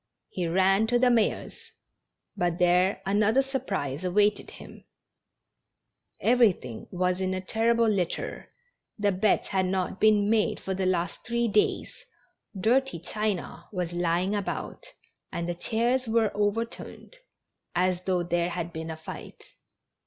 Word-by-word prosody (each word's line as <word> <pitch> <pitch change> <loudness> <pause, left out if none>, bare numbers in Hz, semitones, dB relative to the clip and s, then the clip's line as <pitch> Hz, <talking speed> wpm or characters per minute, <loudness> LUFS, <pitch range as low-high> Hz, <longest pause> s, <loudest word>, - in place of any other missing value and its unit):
He 180 -2 -3
ran 190 +5 +3
to 240 +1 +3
the 250 0 +4
mayor's, 230 -3 -1 0.6
but 175 -1 0
there 180 +2 +3
another 215 +6 +3
surprise 195 - -3
awaited 205 +3 +2
him; - - -13 1.4
everything 210 - +2
was 180 0 0
in 185 0 0
a - - -2
ter 225 +5 +1
rible 230 -1 +3
litter, 180 -3 -3 0.5
the 205 -1 +2
beds 195 +3 +1
had 190 -2 +1
not 185 0 -2
been 210 -2 +4
made 215 0 +2
for 190 - -3
the 190 0 -1
last 180 -1 -1
three 235 0 0
days, 210 -1 +1 0.7
dirty 255 +3 +2
china 205 +3 -3
was 180 -4 -3
lying 175 +3 0
about, 205 - -4 0.4
and 170 0 -3
the 175 - -1
chairs 235 +7 0
were 225 -2 +1
overturned, 225 - -3 0.6
as 180 0 +1
though 185 -1 0
there 175 0 0
had 170 -1 -4
been 160 0 -5
a 160 - -5
fight. 160 - -10
195 Hz, 140 wpm, -27 LUFS, 180-220 Hz, 1.4 s, the